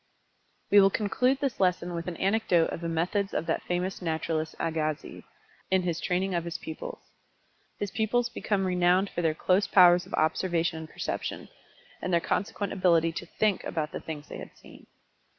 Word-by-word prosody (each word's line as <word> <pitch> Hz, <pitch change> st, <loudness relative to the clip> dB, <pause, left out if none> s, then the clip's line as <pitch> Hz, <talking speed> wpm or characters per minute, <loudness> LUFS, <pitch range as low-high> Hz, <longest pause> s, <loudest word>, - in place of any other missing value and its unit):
We 205 Hz, -, +8 dB
will 195 Hz, -, +6 dB
conclude 250 Hz, +7 st, +1 dB
this 275 Hz, -3 st, -1 dB
lesson 180 Hz, -2 st, +1 dB
with 170 Hz, 0 st, -4 dB
an 175 Hz, -2 st, -4 dB
anecdote 195 Hz, -4 st, +2 dB
of -, -, -5 dB
the 170 Hz, -, -2 dB
methods 180 Hz, +5 st, -1 dB
of -, -, -1 dB
that 165 Hz, -, 0 dB
famous 180 Hz, +2 st, -2 dB
naturalist 160 Hz, -1 st, -2 dB
Agassiz, 155 Hz, -2 st, -2 dB, 0.5 s
in 190 Hz, -1 st, +2 dB
his 170 Hz, -2 st, -1 dB
training 185 Hz, +2 st, 0 dB
of 170 Hz, -1 st, 0 dB
his 170 Hz, -1 st, -4 dB
pupils. 160 Hz, -, -8 dB, 0.7 s
His 205 Hz, -2 st, -3 dB
pupils 235 Hz, +2 st, +1 dB
became 205 Hz, -5 st, -1 dB
renowned 180 Hz, +1 st, +2 dB
for 175 Hz, -, -2 dB
their 160 Hz, -2 st, +1 dB
close 185 Hz, +4 st, +2 dB
powers 175 Hz, -2 st, +6 dB
of -, -, -3 dB
observation 165 Hz, +1 st, +1 dB
and 160 Hz, 0 st, -8 dB
perception, -, -, -4 dB, 0.5 s
and 185 Hz, -, -2 dB
their 170 Hz, -, +4 dB
consequent 200 Hz, +3 st, -2 dB
ability 170 Hz, -3 st, +3 dB
to 170 Hz, +1 st, -6 dB
"think" 210 Hz, +2 st, 0 dB
about 155 Hz, -2 st, -3 dB
the -, -, -5 dB
things 150 Hz, -2 st, -7 dB
they -, -, -8 dB
had -, -, -11 dB
seen. -, -, -16 dB
180 Hz, 180 wpm, -28 LUFS, 165-195 Hz, 0.7 s, We